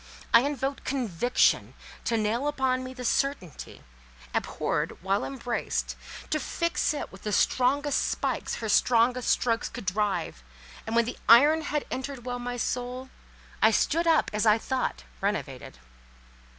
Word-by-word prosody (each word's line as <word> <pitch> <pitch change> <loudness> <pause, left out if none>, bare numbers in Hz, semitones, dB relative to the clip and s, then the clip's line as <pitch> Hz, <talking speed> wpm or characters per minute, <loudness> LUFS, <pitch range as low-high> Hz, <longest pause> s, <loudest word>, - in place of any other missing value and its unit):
I 230 - +10
invoked 275 0 -2
Conviction 245 -3 +1 0.3
to 230 - +1
nail 225 +6 0
upon 265 -3 0
me 255 - -6
the 250 -1 -7
certainty, 275 - -2 0.5
abhorred - - -2
while 195 +2 +1
embraced, 245 -3 -3 0.4
to 310 - +1
fix 335 +3 -1
it - - -5
with 190 - -13
the 210 - -3
strongest 275 +7 +2
spikes - - -2
her 225 - -4
strongest 245 +3 +3
strokes 230 -1 +1
could 240 -3 -8
drive; 195 - -1 0.5
and 225 - -2
when 235 0 +4
the 240 - -6
iron 290 +8 +7
had 295 -1 -2
entered 265 -2 -5
well 245 -1 -3
my 245 0 -4
soul, 250 +2 -3 0.5
I - - +7
stood 335 +2 +1
up, 325 -1 +3
as 210 +1 +1
I 215 +1 +6
thought, 255 - -2 0.2
renovated. - - -3
250 Hz, 145 wpm, -27 LUFS, 230-275 Hz, 0.5 s, I